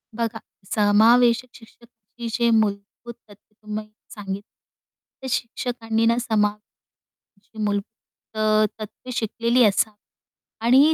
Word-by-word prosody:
बघा 230 -1 -2 0.3
समावेशक 230 +4 +4
शिक्षकांची 235 0 -12
जे 235 -1 +2
मूलभूत 205 +3 -3 0.2
तथ्य 205 +1 -20
तुम्ही 215 0 -5 0.2
सांगि 200 -2 -5
त्या 265 +4 -16
शिक्षकांनी 230 -1 -1
ना 230 +1 +3
समा 220 -3 +2 0.9
अशी 200 +2 -22
मूलभूत 205 +2 -5
त - - -8 0.4
तत्त्वे 215 +4 -9
शिकलेली 235 +2 +1
अस 205 +1 +3 0.7
आणि 265 +7 +5
225 Hz, 105 wpm, -23 LUFS, 210-235 Hz, 0.9 s, आणि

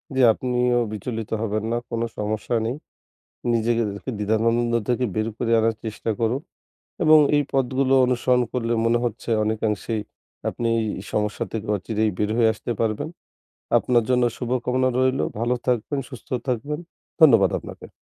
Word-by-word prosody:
জি, 130 - +3
আপনিও 125 0 +1
বিচলিত 110 +1 -4
হবেন 110 -1 -1
না, 120 - +1
কোনো 115 0 -1
সমস্যা 105 +3 -2
নেই। 120 +3 -1 0.8
নিজেকে 115 0 +2
দ্বি 100 +6 -6
দ্বিধানন্দ 115 +3 +1 0.2
থেকে 125 +1 +1
বের 110 +1 0
করে 115 -1 -2
আনার 115 0 +2
চেষ্টা 110 0 -3
করো, 115 +2 +2 0.7
এবং 155 -1 +7 0.2
এই 145 - +4
পথগুলো 135 0 +2
অনুসরণ 125 0 +2
করলে 120 -2 -1
মনে 115 +1 +3
হচ্ছে 115 0 -3
অনেকাংশেই 110 0 -1 0.5
আপনি 115 - -2 0.4
সমস্যা 105 0 -1
থেকে 110 -1 -4
অচিরেই 110 +2 -1
বের 105 0 0
হয়ে 115 -2 +4
আসতে 110 +2 -7
পারবেন। 110 +4 0 0.7
আপনার 120 -2 +2
জন্য 125 -1 +3
শুভকামনা 125 +1 0
রইলো 130 +1 +2 0.2
ভালো, 120 +2 +1
থাকবেন 125 +3 0
সুস্থ 125 -4 -11 0.2
থাকবেন, 145 +5 -2 0.4
ধন্যবাদ 115 - +7
আপনাকে। - - -11
115 Hz, 145 wpm, -23 LUFS, 110-125 Hz, 0.8 s, এবং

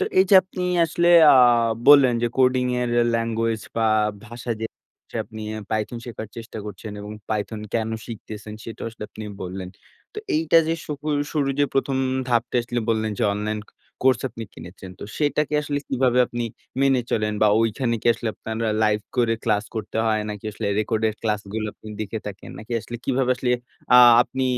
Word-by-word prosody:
তো - - +2
এইযে 190 +1 +5
আপনি 185 0 -6 0.2
আসলে 170 +2 0 0.3
আ - - +7 0.5
বললেন 140 -4 +8
যে, - - +3
coding 130 -1 +3
এর 125 - 0
এ - - +4
ল্যাঙ্গুয়েজ 115 -1 -1
বা, 115 - +2 0.4
ভাষা 120 +1 -7
যেটা 110 - -5 0.3
হচ্ছে - - -10
আপনি 110 0 -10
এ - - -4
python 110 +2 -2
শেখার 110 -3 -7
চেষ্টা 115 -1 -8
করছেন 105 +1 -8
এবং 105 +1 -7 0.2
python 110 0 -2
কেন 110 -1 0 0.2
শিখতেছেন? 110 -1 -8
সেটা 115 -1 -8
আসলে 115 -1 -11
আপনি 110 - -8 0.2
বললেন। 95 0 -6 0.5
তো - - -5 0.2
এইটা 315 - +4
যে, 165 - +1
শুহু 150 0 -6 0.3
শুরু 145 -3 0
যে, 145 - +5
১ম 135 0 +1 0.3
ধাপটা 120 +1 +1
আসলে 120 +1 -3
বললেন 110 -1 +1
যে, - - -1
অনলাইন 105 +1 -2 0.4
কোর্স 130 0 +4
আপনি 115 +1 -7
কিনেছেন। 90 +1 -10
তো - - -7
সেটাকে 150 0 0
আসলে 145 -1 -2
কিভাবে 125 -1 +2
আপনি 120 0 -4 0.4
মেনে 135 -2 +4
চলেন? 105 -1 0
বা - - +6
ঐখানে 115 +2 0
কি - - -4
আসলে 115 0 -4
আপনার 110 0 -6
আ - - 0
লাইভ 105 0 +2 0.2
করে 115 -2 +3
ক্লাস 105 -2 +1
করতে 110 -1 -5
হয়? 110 -1 +2
নাকি 105 -1 -8
আসলে 110 +1 -4
রেকর্ডের 110 0 0
ক্লাসগুলো 105 0 -2
আপনি 110 - -13
দেখে 110 +1 -3
থাকেন? 100 -1 -8
নাকি 110 +3 -8
আসলে 120 - -7
কিভাবে 130 -1 +1
আসলে 125 0 -1 0.4
আ - - +10 0.3
আপনি 130 +1 -4
115 Hz, 185 wpm, -23 LUFS, 110-130 Hz, 0.5 s, আ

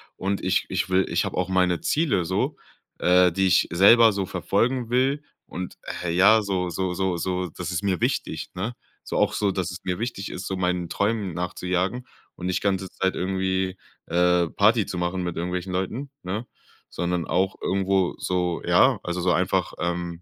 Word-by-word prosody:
und 100 +1 -2
ich 95 0 +1
ich - - -1
will 95 0 +3
ich - - +1
habe - - -4
auch 90 +1 -1
meine 90 -2 +2
Ziele 150 - +1
so, 95 +3 -1 0.4
äh, 90 -1 +4
die 95 +1 +2
ich 90 - +4
selber 110 +5 +6
so 100 -1 -1
verfolgen 125 +5 0
will 130 +4 +2 0.2
und, 90 0 -7 0.3
äh, 85 - -1
ja, 100 +5 +6
so 95 -3 -1
so 95 +1 -2
so 95 -1 -1
so 90 0 -2
das 90 +2 -6
ist 90 0 -2
mir 95 -4 0
wichtig, - - -2
ne? 100 +7 -3 0.3
So - - -4
auch - - +2
so, 100 -2 +1
dass 90 -1 -2
es 90 - -7
mir 90 +1 -2
wichtig 115 -4 -4
ist, 95 - -6
so 95 - -2
meinen 90 -2 -1
Träumen 100 -2 -1
nachzujagen 90 +6 -2 0.3
und - - -7
nicht 90 0 0
ganze 95 -2 0
Zeit 95 +1 -1
irgendwie, 95 0 -1 0.3
äh, 90 0 +3
Party 110 +1 +3
zu 90 - -5
machen 90 +1 -1
mit 90 -1 -3
irgendwelchen 90 +2 -3
Leuten, 110 +10 -3
ne? 100 +6 -3 0.4
Sondern 90 -1 -2
auch 95 +1 +1
irgendwo 95 -1 +1
so 90 -2 -1
ja, - - +5
also 90 +1 -3
so 90 0 +2
einfach, - - 0
ähm 85 0 -3
95 Hz, 185 wpm, -24 LUFS, 90-100 Hz, 0.4 s, selber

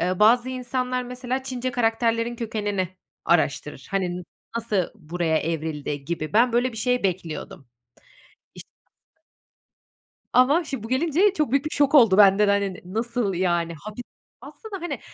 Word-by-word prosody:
eee, 180 +2 0
bazı 240 +4 +5
insanlar, 255 0 -2
mesela, 250 +1 -4
Çince 255 -1 -3
karakterlerin 230 0 0
kökenini 205 -5 -2 0.4
araştırır. 150 -4 0
Hani, 185 -3 -1
"N 180 - -6 0.3
nasıl 215 -6 0
buraya 160 0 -1
evrildi?" 150 -3 -3
gibi 155 +1 -4
ben 235 +3 +4
böyle 245 +1 +1
bir - - -10
şey 250 +2 0
bekliyordum. 170 -8 -4 0.9
İşin - - -12 0.5
aslı. - - -43 1.1
Ama 280 +7 +4
şim 270 -8 -5
bu - - -6
gelince 330 - +2
çok 305 - -1
büyük 275 +2 +2
bir - - -1
şok 285 0 +2
oldu 225 -8 +6
bende 205 0 +6
de, - - +4
hani, 200 -1 0
ne - - -11
nasıl 225 +1 -2
yani, 175 -2 0
hapi 215 +8 -8 0.4
Aslında, 405 -5 -9
hani, 345 - -4
225 Hz, 155 wpm, -24 LUFS, 180-255 Hz, 1.1 s, oldu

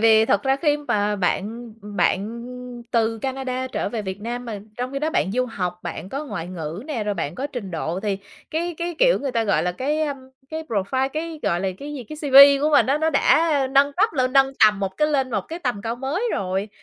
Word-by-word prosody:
vì 220 0 +6
thật 200 -2 +2
ra 270 0 +2
khi 295 0 +2
mà 210 -8 0
bạn 220 +5 -2
bạn 210 +2 -1 0.5
từ 225 -1 +1
Canada 260 0 -3
trở 260 - -2
về 225 -3 -3
Việt 190 +1 -5
Nam 240 +2 -4
mà 220 -4 -5 0.2
trong 250 +2 -3
khi 275 - -2
đó 310 +2 -1
bạn 195 - 0
du 255 +1 +1
học, 180 -5 -4
bạn 175 +1 -6
có 280 +6 -4
ngoại 195 - -5
ngữ 170 +2 -5
nè, 240 -9 -3
rồi 205 -1 -1
bạn 165 -2 -3
có 275 - -3
trình 245 -9 -6
độ 165 +2 -3
thì 200 -2 -1 0.3
cái 340 +2 -2
cái, 345 0 -3
kiểu, - - +5
người 275 -3 -3
ta 230 -1 +1
gọi 165 -6 +2
là 180 - 0
cái, 285 - -1
a, 295 -2 0 0.4
cái 315 0 -4
profile 260 +2 -1
cái 315 0 -4
gọi 170 +1 +1
là, 190 - 0
cái 295 +1 -7
gì, 255 -4 -6
cái 305 - -9
CV 280 -1 +8
của 305 - +3
mình 240 -6 +5
á 280 +3 +2
nó 320 +1 +1
đã 290 -1 +3
nâng 280 +1 +4
cấp 420 +6 +2
lên 255 -3 0
nâng 270 -1 +4
tầm 210 -2 +4
một 190 -1 -3
cái 300 0 +2
lên 270 -3 +1
một 205 -3 0
cái 330 +2 -5
tầm 245 - -2
cao 230 +1 -3
mới 275 - -2
rồi. 190 +2 -2
250 Hz, 240 wpm, -23 LUFS, 205-285 Hz, 0.5 s, CV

